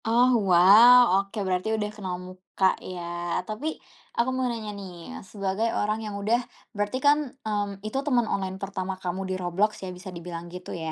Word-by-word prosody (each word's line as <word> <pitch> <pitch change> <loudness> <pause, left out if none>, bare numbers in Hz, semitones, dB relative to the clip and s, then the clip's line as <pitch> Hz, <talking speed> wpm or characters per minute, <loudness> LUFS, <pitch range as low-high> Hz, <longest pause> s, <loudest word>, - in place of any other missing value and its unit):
Oh 240 +3 +4 0.2
wow, 210 +8 +8 0.2
oke 200 +3 -12
berarti 185 +1 -1
udah 210 -1 -2
kenal 190 -4 -4
muka 185 +1 -3 0.2
ya. 185 -1 -7 0.5
Tapi 220 +8 -4 0.5
aku 235 +2 +2
mau 255 -1 0
nanya 225 -3 -4
nih, 190 -2 -8 0.4
sebagai 200 +2 -1
orang 215 +1 0
yang 210 -1 -5
udah 225 +4 +2 0.4
berarti 205 +4 -1
kan, 290 +1 +6 0.3
mmm, 205 -1 -3
itu 215 +5 -3
teman 250 -5 +2
online 190 -1 -2
pertama 190 -1 -3
kamu 180 +1 -3
di - - -1
Roblox 185 +5 +1
ya - - -5
bisa 190 +2 -9
dibilang 170 0 -7
gitu 180 +1 -9
ya? 160 -1 -4
200 Hz, 175 wpm, -26 LUFS, 185-220 Hz, 0.5 s, wow